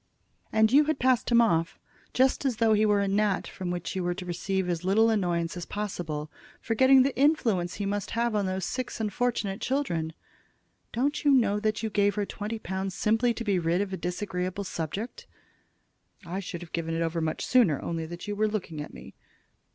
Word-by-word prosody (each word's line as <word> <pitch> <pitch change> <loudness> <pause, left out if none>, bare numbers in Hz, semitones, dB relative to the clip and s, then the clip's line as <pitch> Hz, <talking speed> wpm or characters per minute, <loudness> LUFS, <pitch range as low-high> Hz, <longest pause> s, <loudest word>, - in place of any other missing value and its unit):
"And 220 0 +4
you 290 +3 +6
had 310 -1 0
passed 255 -2 +2
him 235 0 +6
off 165 -7 +1 0.3
just 260 +2 +2
as 265 -4 +1
though 225 -1 +4
he 215 0 +3
were 205 -1 +3
a - - 0
gnat 200 0 +1
from 185 -2 -6
which 175 0 -3
you 185 - -1
were 175 0 -1
to 185 - -7
receive 185 +2 -2
as 175 -1 -2
little 220 +5 +4
annoyance 175 -5 0
as 175 -1 -6
possible, 165 -7 -4 0.3
forgetting 260 +4 +5
the 275 - -1
influence 225 - +2
he 205 - -3
must 205 0 -2
have 235 0 +1
on 205 -2 +1
those 185 -1 -2
six 255 +2 -4
unfortunate 215 -2 -1
children. 170 - -1 0.8
Don't 280 +5 -1
you 290 - +4
know 225 -7 +4
that 215 +1 -1
you 220 - -2
gave 205 -1 +2
her 210 - 0
that - - -7
twenty 215 +2 -4
pounds 190 -2 -4
simply 225 +4 +2
to 235 - -4
be 200 -4 +1
rid 170 +1 +1
of 200 -1 -2
a - - 0
disagreeable 180 +2 -3
subject?" 195 +6 -5 1.0
"I 180 +3 -4
should 180 -3 -6
have 170 - -13
given 165 -1 -2
it 165 - 0
ever 165 0 -1
so - - -1
much 155 - -2
sooner, 225 - +4
only 165 -1 -3
that 175 +4 -8
you 205 - -2
were 215 +1 +2
looking 180 -8 -4
at 150 - -9
me." 60 - -11
200 Hz, 210 wpm, -28 LUFS, 175-225 Hz, 1.0 s, you